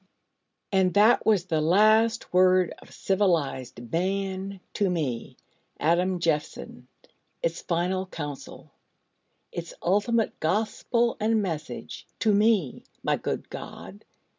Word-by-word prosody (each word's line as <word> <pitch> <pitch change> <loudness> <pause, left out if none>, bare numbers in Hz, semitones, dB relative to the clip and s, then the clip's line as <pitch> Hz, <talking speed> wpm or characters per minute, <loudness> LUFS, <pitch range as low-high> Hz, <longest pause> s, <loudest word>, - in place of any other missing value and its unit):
And 190 -2 +2
that 210 +3 +5
was 205 -5 +3
the 160 -5 0
last 215 +7 +3
word 185 -1 +4
of - - -17
civilised 145 - -1
Man 190 +2 -2
to 200 -2 +1
me, 145 -10 -3 0.4
Adam 175 +4 +2
Jeffson 160 -3 -3 0.6
its 165 0 -1
final 180 +2 -1
counsel 145 -6 -8 0.8
its 170 0 -7
ultimate 210 +5 +1
gospel 225 +6 0
and 220 +1 +2
message 165 -7 -5
to 215 -2 +2
me, 205 - +2 0.2
my - - +2
good - - -4
God! 95 +4 -9
185 Hz, 110 wpm, -26 LUFS, 165-205 Hz, 0.8 s, that